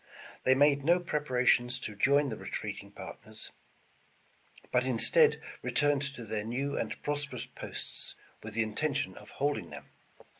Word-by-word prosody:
They 130 - +6
made 140 0 +4
no 170 +4 +5
preparations 125 -6 +2
to 105 -5 -5
join 140 +6 +4
the 110 - -3
retreating - - -5
partners, - - -8 1.2
but 125 0 +3
in 130 -2 0
stead 470 - +5 0.2
returned 145 -2 +2
to 120 - -7
their 110 -1 -2
new 130 +6 -2
and - - -2
prosperous 140 -5 -2
posts, 130 - -5 0.3
with 110 0 -8
the 115 - +3
intention 140 +6 -1
of - - -11
holding 145 +1 -1
them. - - -10
135 Hz, 145 wpm, -31 LUFS, 120-145 Hz, 1.2 s, They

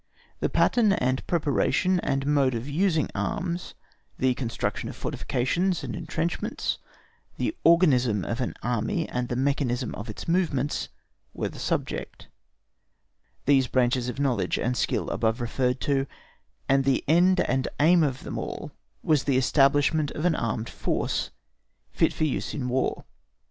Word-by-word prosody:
The - - 0
pattern 220 -5 +3
and 130 -5 0
preparation 175 +3 +1
and 135 -4 -1
the 140 - -2
mode 140 -4 +3
of 115 +3 -4
using 160 0 +1
arms, 170 - -3 0.4
the 130 0 +2
construction 120 -2 -3
of - - -8
fortifications 170 +9 -1
and - - -4
entrenchments, 165 +2 -2 0.6
the 325 - -1
organism 130 - +4
of 115 +3 -3
an 125 - -2
army 125 - -1
and 125 0 -3
the 125 - -1
mechanism 130 -2 0
of 105 +3 -7
its 105 - -7
movements, 160 -6 0 0.5
were - - -2
the - - -11
subject; - - -3 1.2
these 135 -2 +4
branches 125 0 +1
of 125 - -6
knowledge 135 -4 +1
and 125 +1 -1
skill - - 0
above 110 +2 0
referred 125 +2 0
to, 135 -1 +1 0.6
and 135 0 +3
the 135 -1 +1
end 180 +4 +4
and 130 -3 0
aim 170 +4 +5
of 135 -4 0
them - - -4
all - - -5 0.3
was 150 -4 +2
the 135 -3 +2
establishment 145 +3 +3
of 155 - -3
an 180 - +4
armed 115 -4 -2
force - - -2 0.6
fit - - +2
for - - -3
use 150 -4 -1
in 125 -2 -2
War. 130 +1 -1
135 Hz, 150 wpm, -26 LUFS, 125-160 Hz, 1.2 s, aim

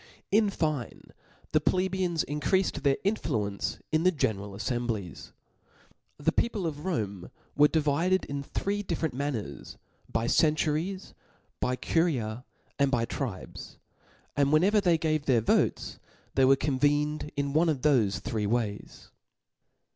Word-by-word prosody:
In 210 0 +4
iine 155 - -3 0.4
the 155 - +3
plebeians 185 -1 0
increa(ed 150 +6 0
their 140 -2 +2
influence 115 - -1 0.2
ia 155 - +4
the 180 +3 +4
general 105 - -2
affcmblics. 110 -2 -3 0.9
The - - +1
people 220 -6 0
of 150 0 -4
Rome 100 - -3 0.3
were 150 +1 +6
divided 160 +5 +1
in 140 0 -4
three 200 +8 -2
different 165 -6 -2
manners, 135 -5 -4 0.3
by 115 0 0
centuries^ 155 +7 +1 0.5
by 125 - 0
curias, 125 -8 0 0.4
and 140 -1 +4
by 120 -3 +1
tribes; 115 -7 -6 0.6
and 140 -1 +2
whenever 195 +7 +4
they 175 -4 +3
gave 155 -2 -1
their 125 -4 +4
votes, 110 - 0 0.3
they 135 - +4
were 135 +1 +6
convened 145 +2 0
one 145 +4 +2
of 145 -5 -1
thofe 120 -10 +2
three 105 -2 -2
ways. 110 -2 -3
145 Hz, 125 wpm, -28 LUFS, 120-165 Hz, 0.9 s, were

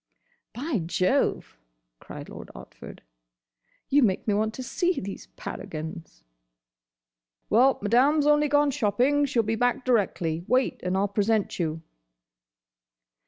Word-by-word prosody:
"By 265 -1 -2
Jove!" 180 - 0 0.4
cried - - -10
Lord - - -10
Otford, - - -12 0.9
"you 285 +2 +3
make 200 -5 +1
me 210 - +2
want 215 +1 0
to 260 - -6
see 355 +7 -1
these 195 +1 -7
paragons!" 160 - -7 1.3
"Well, 255 +5 +5
Madame 255 +8 +3
's - - -2
only 295 0 +4
gone 290 0 +3
shopping. 265 +4 +2
She 270 -3 -1
'll - - +4
be 220 +1 -1
back 245 +3 0
directly. 180 -9 0
Wait, 255 +3 +1
and 180 +1 -1
I - - +1
'll 200 - +1
present 205 +1 0
you." 160 -1 -2
225 Hz, 135 wpm, -26 LUFS, 185-270 Hz, 1.3 s, Well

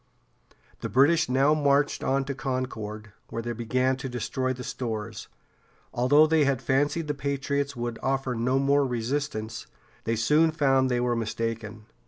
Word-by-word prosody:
The - - -4
British 145 +3 +4
now 135 +4 +4
marched 145 -1 +2
on 135 0 +1
to 140 - -3
Concord, 125 -6 -4 0.2
where 115 - -4
they 120 - -3
began 125 +3 0
to 135 0 -5
destroy 130 +2 -2
the 125 -1 -5
stores. 115 -5 -5 0.7
Although 145 +6 +5
they 155 -1 +3
had 135 -3 +1
fancied 145 +6 0
the 150 - 0
patriots 140 0 -2
would 120 -1 -4
offer 135 -1 -1
no 125 +3 +1
more 140 0 +3
resistance, 120 -2 -3 0.4
they 115 - 0
soon 150 +8 +3
found 135 -4 +2
they 125 -1 +1
were 120 0 +1
mistaken. 115 -1 -4
130 Hz, 155 wpm, -26 LUFS, 115-140 Hz, 0.7 s, Although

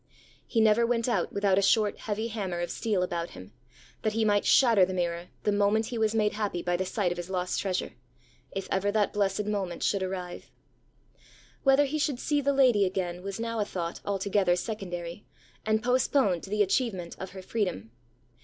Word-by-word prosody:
He 225 - +1
never 220 +1 +5
went 230 0 +1
out 210 -8 0
without 200 -1 +2
a - - +2
short 210 +1 +2
heavy 220 +2 -3
hammer 195 -6 -3
of 175 - -3
steel 210 -5 0
about 170 -1 -3
him, 95 +3 -12 0.5
that 215 -1 0
he 225 0 +1
might 205 -1 +2
shatter 230 -7 +6
the 185 +1 0
mirror 175 -1 -2 0.2
the 210 - +2
moment 205 +2 +2
he 235 - -2
was 220 0 +1
made 210 -1 +2
happy 205 -5 -2
by 175 0 0
the 185 +1 -2
sight 185 -2 0
of 175 - -4
his 175 +1 -6
lost 180 -1 -1
treasure, 190 -2 -2 0.6
if 195 -1 -5
ever 195 +1 +1
that 210 -1 +1
blessed 200 0 0
moment 195 -4 -2
should 200 - +1
arrive. 185 -1 -5 1.1
Whether 270 +1 +5
he 305 +3 -2
should 285 -4 0
see 290 +1 +1
the 280 0 +2
lady 255 -7 +4
again, 180 -2 -2
was 195 +2 -5
now 230 0 -2
a - - +3
thought 170 -4 -4
altogether 195 -2 +1
secondary, 180 -3 -5 0.4
and 220 0 +2
postponed 250 - +2
to - - -10
the 210 0 +3
achievement 195 -4 -1
of 190 - -5
her 190 -1 -8
freedom. 180 - -2
200 Hz, 195 wpm, -28 LUFS, 180-220 Hz, 1.1 s, shatter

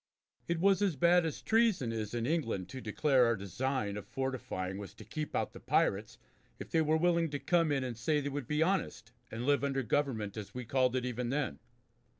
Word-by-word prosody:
It 170 -1 0
was 195 +1 +4
as 195 -6 +2
bad 170 +4 +4
as 155 - -6
treason 220 - +2
is 110 0 -3
in 115 -1 -1
England 115 - -1
to 130 - -7
declare 130 +3 +3
our 115 - +2
design 105 +2 -2
of 105 - -8
fortifying 115 -8 -3
was 100 - -8
to - - -12
keep 155 -1 -5
out - - -1
the - - -10
pirates - - +1 0.4
if - - -9
they 160 - +3
were 155 0 +3
willing 170 0 +2
to 145 - -3
come 165 +1 +2
in 135 -2 +1
and 125 -2 -4
say 150 +7 +1
they 145 0 -2
would 140 -3 -4
be 150 +1 +2
honest 160 -10 -1 0.2
and 115 +2 -5
live 145 0 +3
under 135 -1 0
government 110 -5 -1
as 105 +1 -7
we 125 -1 -5
called 130 +1 +2
it 125 -1 0
even 125 -1 -2
then. 130 - -1
135 Hz, 215 wpm, -32 LUFS, 115-155 Hz, 0.4 s, was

